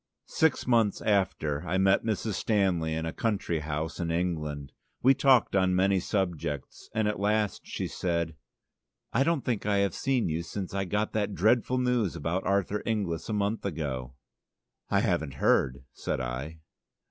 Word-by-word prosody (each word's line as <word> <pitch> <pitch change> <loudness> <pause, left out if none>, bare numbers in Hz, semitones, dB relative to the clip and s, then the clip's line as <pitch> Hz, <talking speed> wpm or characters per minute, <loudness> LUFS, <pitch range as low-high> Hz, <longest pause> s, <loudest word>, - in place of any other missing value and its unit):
Six 160 -3 +1
months 115 -5 +3
after 95 -8 +1
I 90 +2 -1
met 95 0 +4
Mrs. 110 -1 -1
Stanley 95 -6 +1
in 80 0 -2
a 80 - -3
country 100 -7 -1
house 75 +1 -3
in 85 -1 -1
England. 75 -5 -2 0.3
We 135 +2 +7
talked 130 -6 +4
on 95 -1 +3
many 95 +1 +3
subjects 85 - -3
and 110 -1 +2
at 105 - -1
last 105 -1 0
she - - -3
said: 85 -3 -2 0.8
"I 130 - +4
don't 165 -2 0
think 115 -5 -1
I 100 -1 +2
have 100 -3 +2
seen 135 -3 0
you 80 +1 -1
since 95 +2 -5
I 100 0 -1
got 105 +4 -1
that 105 -2 -1
dreadful 120 +5 +3
news 125 -8 +1
about 85 +4 -2
Arthur 100 +1 +1
Inglis 100 -7 -2
a - - -1
month 105 +2 0
ago." 70 -8 -4 0.7
"I - - +3
haven't 70 -3 0
heard," 65 0 +2
said - - -3
I. 65 +6 -5
95 Hz, 165 wpm, -28 LUFS, 80-105 Hz, 0.8 s, We